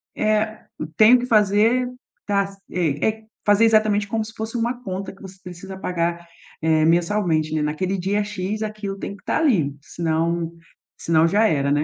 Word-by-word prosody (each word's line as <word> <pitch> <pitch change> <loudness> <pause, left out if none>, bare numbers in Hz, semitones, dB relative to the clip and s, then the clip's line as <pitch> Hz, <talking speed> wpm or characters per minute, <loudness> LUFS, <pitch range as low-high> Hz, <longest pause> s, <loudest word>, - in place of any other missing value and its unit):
"Eh, 215 0 0 0.4
tenho 230 +3 +7
que 245 - -3
fazer". 220 +2 +3 0.4
Tá, 200 -1 +1
sei, 180 -6 -3
eh, 220 0 0 0.2
fazer 205 +2 +5
exatamente 215 -2 +3
como 220 +1 -2
se 220 - -10
fosse 220 +2 -5
uma 240 +2 -2
conta 190 -1 -5
que - - -20
você 190 0 -11
precisa 185 +1 -9
pagar, 170 -2 -2 0.4
eh, 160 -1 +3
mensalmente, 170 -2 +1
né, 155 - 0
naquele 155 +6 -1
dia 200 +3 0
X 210 +1 -4
aquilo 210 -2 -5
tem 200 - -6
que 200 - -20
tá - - 0
ali, 200 - +2
senão 165 +1 -1 0.5
senão 165 0 +3
já 210 +6 +3
era, 140 -5 +1
né. 145 +1 +2
195 Hz, 170 wpm, -22 LUFS, 170-215 Hz, 0.5 s, tenho